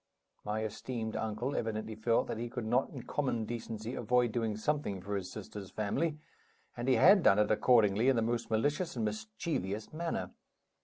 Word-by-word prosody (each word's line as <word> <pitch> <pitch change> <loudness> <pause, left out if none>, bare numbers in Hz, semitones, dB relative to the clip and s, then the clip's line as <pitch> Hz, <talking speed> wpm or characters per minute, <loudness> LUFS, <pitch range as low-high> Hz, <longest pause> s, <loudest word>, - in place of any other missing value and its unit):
My 110 +1 -2
esteemed 110 +1 -4
uncle 110 +5 -2
evidently 110 0 -2
felt 110 +2 +1
that 110 - -4
he 120 0 -3
could 120 -1 -4
not 125 +4 +2
in 130 -4 -8
common 125 -4 -1
decency 115 0 -5
avoid 120 0 +2
doing 110 -2 -1
something 110 -5 -1
for 100 +3 -4
his 95 -2 -4
sister's 105 -2 -8
family; 110 - -1 0.6
and 120 +1 -4
he 130 - +5
had 195 +1 +7
done 100 - +5
it 105 0 +3
accordingly 110 0 +4
in 135 - +4
the 115 - +2
most 115 0 -1
malicious 145 +10 0
and 115 -3 -1
mischievous 110 - -3
manner. 165 +1 -3
115 Hz, 175 wpm, -32 LUFS, 110-125 Hz, 0.6 s, had